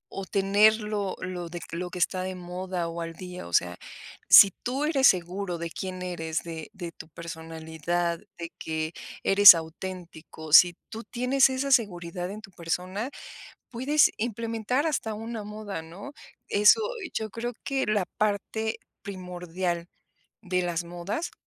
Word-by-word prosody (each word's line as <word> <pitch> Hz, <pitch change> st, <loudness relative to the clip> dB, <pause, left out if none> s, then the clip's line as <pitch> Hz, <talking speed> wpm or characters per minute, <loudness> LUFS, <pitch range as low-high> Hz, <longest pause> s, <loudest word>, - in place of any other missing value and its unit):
o 195 Hz, -, -4 dB
tenerlo 205 Hz, +1 st, +2 dB
lo 180 Hz, -2 st, -5 dB
de 175 Hz, -, -6 dB
lo 180 Hz, +2 st, -4 dB
que 180 Hz, -, -8 dB
está 185 Hz, +1 st, 0 dB
de 185 Hz, 0 st, -4 dB
moda 180 Hz, -1 st, -4 dB
o 170 Hz, 0 st, -5 dB
al 165 Hz, 0 st, -5 dB
día, 180 Hz, -, -8 dB
o 85 Hz, -, -12 dB
sea. 90 Hz, 0 st, +2 dB, 0.5 s
Si 200 Hz, -, +10 dB
tú 260 Hz, +4 st, -1 dB
eres 285 Hz, -4 st, +2 dB
seguro 180 Hz, 0 st, 0 dB
de 170 Hz, 0 st, -4 dB
quién 185 Hz, 0 st, -5 dB
eres, 165 Hz, -3 st, -3 dB
de 165 Hz, -2 st, -7 dB
de 175 Hz, -4 st, -7 dB
tu 160 Hz, -, -12 dB
personalidad 165 Hz, +1 st, -4 dB, 0.2 s
de 170 Hz, 0 st, -6 dB
que 160 Hz, 0 st, -3 dB, 0.3 s
eres 200 Hz, 0 st, +10 dB
auténtico. 160 Hz, -2 st, -8 dB
Si 175 Hz, +1 st, +8 dB
tú 225 Hz, +1 st, -7 dB
tienes 255 Hz, +3 st, +2 dB
esa 265 Hz, +1 st, -2 dB
seguridad 180 Hz, -7 st, 0 dB
en 215 Hz, -, -8 dB
tu 195 Hz, -, -13 dB
persona 185 Hz, +7 st, -3 dB, 0.6 s
puedes 275 Hz, +5 st, +3 dB
implementar 230 Hz, +4 st, -1 dB
hasta 255 Hz, -8 st, -1 dB
una 225 Hz, +1 st, -5 dB
moda, 210 Hz, -4 st, -6 dB
¿no? 185 Hz, -, -10 dB, 0.4 s
Eso 210 Hz, -, +6 dB, 0.3 s
yo 220 Hz, -1 st, -3 dB
creo 235 Hz, +4 st, -4 dB
que 270 Hz, -1 st, -1 dB
la 210 Hz, -3 st, +1 dB
parte 215 Hz, +1 st, -1 dB, 0.2 s
primordial 180 Hz, -2 st, -4 dB, 0.5 s
de 180 Hz, -2 st, 0 dB
las 175 Hz, -1 st, -1 dB
modas. 175 Hz, -, -4 dB
185 Hz, 150 wpm, -27 LUFS, 170-215 Hz, 0.6 s, Si